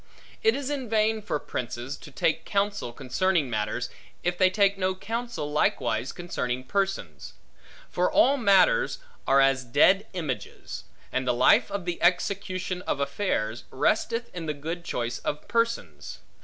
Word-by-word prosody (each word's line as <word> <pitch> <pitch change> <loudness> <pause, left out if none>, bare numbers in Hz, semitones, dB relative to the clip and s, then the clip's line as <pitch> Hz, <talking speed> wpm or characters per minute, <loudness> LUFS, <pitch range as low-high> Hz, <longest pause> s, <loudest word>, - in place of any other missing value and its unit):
It 445 0 +4
is 280 0 -3
in 265 -5 -3
vain 220 0 +2
for 200 - -1
princes, 125 0 -5
to - - -12
take 150 +2 0
counsel 200 - -1
concerning 140 +4 0
matters, 110 +2 -2 0.3
if 175 0 +1
they 185 +1 +4
take 200 +1 +3
no 185 -1 0
counsel 225 -5 -4
likewise 130 -4 +1
concerning 130 -8 -3
persons; 190 - -2 0.5
for 180 +1 0
all 275 +2 +5
matters 270 - +4 0.3
are 135 - +5
as 135 -1 +3
dead 185 - +4
images; 155 -9 -5 0.3
and 130 0 -1
the 125 - +2
life 205 - +5
of 200 -3 -4
the 175 -1 -3
execution 185 0 0
of 140 - 0
affairs, 140 - -1
resteth 230 - 0
in 165 -2 -5
the 150 - -1
good 165 +4 -5
choice 120 -6 -3
of 150 - -4
persons. 230 - -1
175 Hz, 150 wpm, -27 LUFS, 130-205 Hz, 0.5 s, all